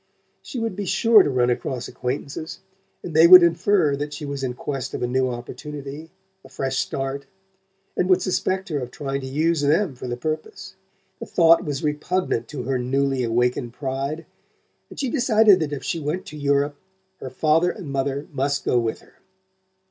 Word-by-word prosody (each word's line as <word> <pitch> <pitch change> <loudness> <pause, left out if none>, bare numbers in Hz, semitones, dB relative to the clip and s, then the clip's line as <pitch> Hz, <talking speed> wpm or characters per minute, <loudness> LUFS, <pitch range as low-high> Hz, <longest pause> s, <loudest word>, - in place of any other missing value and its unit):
She - - -8
would 225 -4 -2
be 200 -1 -4
sure 225 +3 +5
to 145 - +1
run 125 -2 +2
across 125 0 -3
acquaintances, 140 +5 -5 0.5
and 170 - -6
they 160 +2 +7
would 180 0 +11
infer 170 -2 +2
that 145 +1 -5
she 150 - -6
was 140 -1 -5
in 125 -2 -2
quest 135 0 -4
of - - -4
a - - +1
new 130 +1 +1
opportunity, 140 +5 -7 0.3
a 130 - -15
fresh 135 0 -3
start, 135 0 -3 0.7
and 180 - 0
would 185 -1 +4
suspect 190 0 -1
her 150 -3 -1
of 125 -2 -5
trying 140 +1 -4
to 130 - -6
use 155 +3 +1
them 155 +3 +2
for 125 0 -8
the 120 0 -3
purpose. 155 - -5 0.5
The - - -7
thought 165 -1 +5
was 145 -1 -4
repugnant 150 -4 -1
to 135 -2 -6
her 130 +1 -1
newly 135 +1 0
awakened 120 0 0
pride, 140 +4 -4 0.6
and - - -11
she 270 - -1
decided 220 -7 +5
that 155 -2 -2
if 145 - -5
she 165 - -2
went 155 +5 -3
to - - -10
Europe 145 0 0 0.4
her 130 - -6
father 155 +6 +2
and 180 -2 -7
mother 140 +1 -2
must 140 +1 -1
go 125 - +3
with 115 -1 -3
her. - - -23
145 Hz, 185 wpm, -23 LUFS, 130-165 Hz, 0.7 s, would